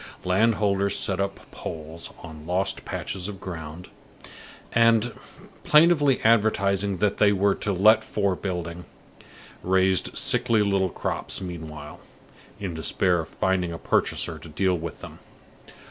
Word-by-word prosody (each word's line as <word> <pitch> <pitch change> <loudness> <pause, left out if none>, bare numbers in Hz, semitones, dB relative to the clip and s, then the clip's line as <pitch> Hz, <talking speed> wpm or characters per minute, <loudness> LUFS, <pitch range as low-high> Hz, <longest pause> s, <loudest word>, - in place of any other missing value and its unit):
Land 105 +5 +3
holders 100 -1 +1
set 95 -1 0
up 100 0 -5
poles 80 +1 -7
on 80 -1 -10
lost 90 +2 -1
patches 95 -1 -4
of 100 -2 -7
ground, 80 -1 -8 0.8
and, 115 0 +3 0.5
plaintively 150 -3 +4
advertising 100 -3 +2
that 105 +2 0
they 105 -1 +4
were 100 0 +2
to 105 - -3
let 110 +4 +5
for 100 -3 -1
building, 90 -2 -5 0.8
raised 95 0 +2
sickly 120 -3 +2
little 100 -2 +1
crops - - -4
meanwhile, 80 -5 -8 0.6
in 95 -4 -4
despair 85 +3 0
of 80 - -5
finding 95 -2 0
a 85 - -5
purchaser - - 0
to 85 - -11
deal 95 +4 +1
with 85 -2 -6
them. - - -10
95 Hz, 130 wpm, -25 LUFS, 85-105 Hz, 0.8 s, let